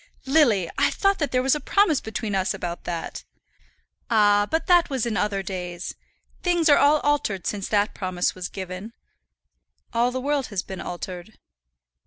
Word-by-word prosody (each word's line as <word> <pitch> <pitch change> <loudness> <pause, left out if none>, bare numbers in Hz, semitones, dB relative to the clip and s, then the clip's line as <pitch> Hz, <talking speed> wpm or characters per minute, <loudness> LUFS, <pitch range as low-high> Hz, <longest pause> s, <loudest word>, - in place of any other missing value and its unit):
"Lily, 265 - +3
I - - +4
thought 395 0 +1
that 295 - -1
there 255 0 +1
was 265 - +3
a 300 - 0
promise 325 -1 +2
between 220 -1 -4
us 190 +1 0
about 175 -2 -5
that." 165 - -5 0.9
"Ah! 205 -2 +4
but 320 - 0
that 350 -2 +4
was 265 -5 -1
in 230 -2 -2
other 200 -1 0
days. 180 -1 -5 0.5
Things 345 -3 +2
are 290 - +7
all 295 +1 +4
altered 250 -11 0
since 200 -2 -2
that 205 0 +1
promise 185 -2 -1
was 185 -1 -6
given, 190 +3 -7 1.0
all 235 +1 +2
the 255 +1 -3
world 280 0 -1
has 200 -3 -3
been 190 -2 -7
altered." 180 +3 -7
210 Hz, 170 wpm, -24 LUFS, 185-285 Hz, 1.0 s, are